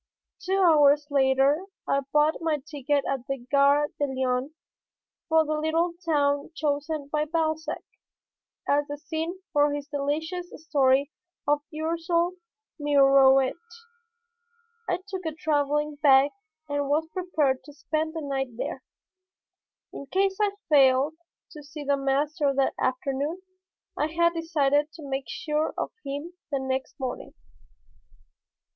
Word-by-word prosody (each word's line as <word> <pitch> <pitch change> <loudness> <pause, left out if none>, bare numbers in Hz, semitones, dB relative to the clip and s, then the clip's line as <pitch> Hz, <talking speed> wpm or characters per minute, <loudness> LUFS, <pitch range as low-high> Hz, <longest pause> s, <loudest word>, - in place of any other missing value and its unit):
Two 380 +1 -1
hours 295 -3 +5
later 270 +3 +3 0.2
I 275 - +2
bought 300 +2 +2
my 320 -2 +1
ticket 290 -1 -2
at 265 -2 -3
the 275 -1 -2
Gare 285 +1 +4
de 290 - +2
Lyon 260 +2 -1 0.7
for 320 0 +4
the 305 - -1
little 320 +3 0
town 285 -3 +1
chosen 295 -1 -2
by 300 0 0
Balzac 315 0 -2 0.8
as 290 0 +2
the 290 - -5
scene 325 +4 -4
for 290 -1 +4
his 290 0 -4
delicious 320 +5 -3 0.2
story 275 -1 +3 0.4
of 290 0 +3
Ursule 335 +2 0 0.5
Mirouet. 275 -2 +5 1.4
I 365 - -1
took 380 -2 -5
a 315 - -4
traveling 295 -2 0
bag 275 -1 +6 0.4
and 285 -1 -2
was 305 +2 +2
prepared 315 -8 0
to 295 - -11
spend 315 +2 -3
the 320 - -3
night 270 -4 -3
there. - - -4 1.1
In 280 - -8
case 385 +5 0
I 405 -1 +1
failed 275 0 +4 0.4
to 305 - -10
see 295 +1 -9
the 285 0 +2
master 280 +1 0
that 270 0 +2
afternoon 275 +7 -2 0.5
I 300 - 0
had 340 +2 +2
decided 300 -3 +1
to 315 -4 -10
make 270 0 -3
sure 305 0 -2
of - - -2
him 285 +5 -5 0.2
the 280 - +1
next 265 +1 -3
morning. 255 -2 -5
290 Hz, 130 wpm, -26 LUFS, 275-320 Hz, 1.4 s, bag